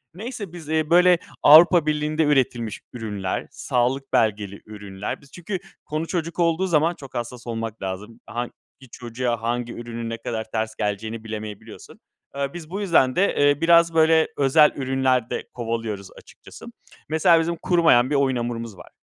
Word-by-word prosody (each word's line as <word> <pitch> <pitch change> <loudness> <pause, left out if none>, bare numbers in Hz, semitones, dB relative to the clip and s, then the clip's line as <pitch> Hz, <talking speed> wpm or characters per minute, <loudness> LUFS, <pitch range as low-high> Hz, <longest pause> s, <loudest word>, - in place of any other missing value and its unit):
Neyse 215 -3 -7
biz, 165 -4 -10
eee, 155 -1 0
böyle 180 +1 +6 0.3
Avrupa 165 +2 +8
Birliği'nde 155 +1 0
üretilmiş 125 -6 0
ürünler, 105 -5 -4
sağlık 130 +2 -1
belgeli 100 -2 0
ürünler, 105 0 -7
biz 140 - -20
çünkü 180 +2 -5 0.3
konu 155 +2 -3
çocuk 170 -1 -3
olduğu 170 +2 +2
zaman 165 0 +2
çok 135 -5 -12
hassas 120 0 -6
olmak 115 -1 -5
lazım. 100 +5 -6
Hangi 120 0 -4 0.4
çocuğa, 120 -1 -3
hangi 120 +1 -2
ürünün 115 -1 -6
ne 115 - -4
kadar 115 -1 -4
ters 110 0 -2
geleceğini 110 +2 -3
bilemeyebiliyorsun. 110 -2 -9 0.4
Eee, 140 0 -3
biz 170 -3 -9
bu 195 +4 -4
yüzden 160 -10 +3
de, 195 +2 +2
eee, 145 +1 +3
biraz, 170 0 +5
böyle, 160 0 +4
özel 145 +2 +5
ürünler 130 -3 0
de - - -4
kovalıyoruz 115 -4 -4
açıkçası. - - -14 0.4
Mesela 165 +2 +4
bizim 170 +1 -1
kurumayan 165 -8 +3
bir 145 - 0
oyun 135 -2 +2
hamurumuz 115 -3 -4
var. - - -13
130 Hz, 160 wpm, -23 LUFS, 115-160 Hz, 0.4 s, Avrupa